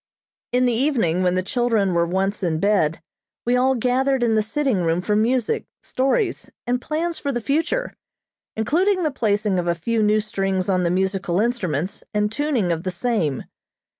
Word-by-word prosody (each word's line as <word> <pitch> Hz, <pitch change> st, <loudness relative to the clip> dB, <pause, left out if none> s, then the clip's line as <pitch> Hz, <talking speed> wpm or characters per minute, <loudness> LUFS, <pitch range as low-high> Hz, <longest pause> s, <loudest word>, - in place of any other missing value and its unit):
In 250 Hz, +1 st, +2 dB
the 245 Hz, -, +2 dB
evening, 225 Hz, -, +1 dB
when 180 Hz, -1 st, +2 dB
the 185 Hz, -, 0 dB
children 220 Hz, -3 st, +1 dB
were 170 Hz, 0 st, +2 dB
once 195 Hz, +3 st, -1 dB
in 165 Hz, -4 st, 0 dB
bed, 165 Hz, -5 st, +1 dB, 0.4 s
we 245 Hz, +1 st, +2 dB
all 260 Hz, +1 st, +3 dB
gathered 255 Hz, +2 st, +1 dB
in 230 Hz, -2 st, +2 dB
the 215 Hz, -, +3 dB
sitting 260 Hz, +2 st, 0 dB
room 165 Hz, 0 st, +1 dB
for 210 Hz, +3 st, 0 dB
music, 230 Hz, +2 st, +1 dB, 0.2 s
stories 350 Hz, -, 0 dB, 0.2 s
and 245 Hz, +1 st, 0 dB
plans 330 Hz, +4 st, -2 dB
for 280 Hz, -, -2 dB
the 240 Hz, -, -2 dB
future, 325 Hz, -, -1 dB, 0.6 s
including 360 Hz, -, +1 dB
the 310 Hz, -, +1 dB
placing 210 Hz, -6 st, 0 dB
of 175 Hz, -, -2 dB
a 170 Hz, -, +1 dB
few 225 Hz, +7 st, -1 dB
new 210 Hz, 0 st, +3 dB
strings 195 Hz, -3 st, -1 dB
on 185 Hz, -1 st, +2 dB
the 170 Hz, -, +1 dB
musical 190 Hz, 0 st, 0 dB
instruments 190 Hz, -, -1 dB
and 210 Hz, 0 st, +1 dB
tuning 255 Hz, -, 0 dB
of 165 Hz, -1 st, -1 dB
the 185 Hz, -, -3 dB
same. 180 Hz, -, -1 dB
215 Hz, 180 wpm, -22 LUFS, 185-255 Hz, 0.6 s, all